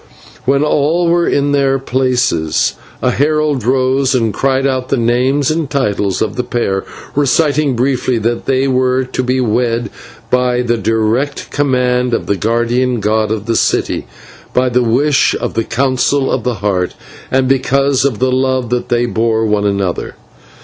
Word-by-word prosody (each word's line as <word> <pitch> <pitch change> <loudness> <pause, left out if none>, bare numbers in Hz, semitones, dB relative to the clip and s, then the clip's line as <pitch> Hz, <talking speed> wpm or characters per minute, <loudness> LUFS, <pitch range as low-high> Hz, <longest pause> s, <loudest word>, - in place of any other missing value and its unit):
When 140 +2 +2
all 155 +3 +1
were 170 0 +2
in 145 0 +1
their 135 -1 +2
places 125 - 0 0.3
a 125 - +3
herald 150 -1 0
rose 130 +2 +1
and 115 -4 0
cried 135 +3 0
out 130 -2 -1
the 135 - +1
names 130 +5 +1
and 155 -3 -2
titles 105 -8 0
of 105 +1 -4
the 125 - 0
pair, 105 -6 -1 0.3
reciting 145 0 +2
briefly 125 0 0
that 115 +2 -2
they 135 0 +1
were 130 0 +1
to 130 - -3
be 130 +1 0
wed 120 -1 0 0.4
by 125 -1 +1
the 120 -1 +1
direct 115 +6 -1
command 125 -3 +1
of - - -3
the 100 - 0
guardian 120 +4 0
god 110 +1 0
of 110 -1 -3
the 115 - -1
city, - - 0 0.5
by 125 0 +3
the 125 +1 +2
wish 130 +5 +2
of - - -3
the 115 - 0
Council 130 +3 0
of 125 - -1
the 125 0 -1
Heart, 95 -3 -1 0.3
and 130 0 +1
because 135 +1 +2
of 135 -6 0
the 130 +2 +1
love 130 -2 0
that 125 0 -1
they 120 0 +1
bore 115 -1 0
one 105 -1 +1
another. 100 -3 -2
125 Hz, 165 wpm, -15 LUFS, 115-135 Hz, 0.5 s, a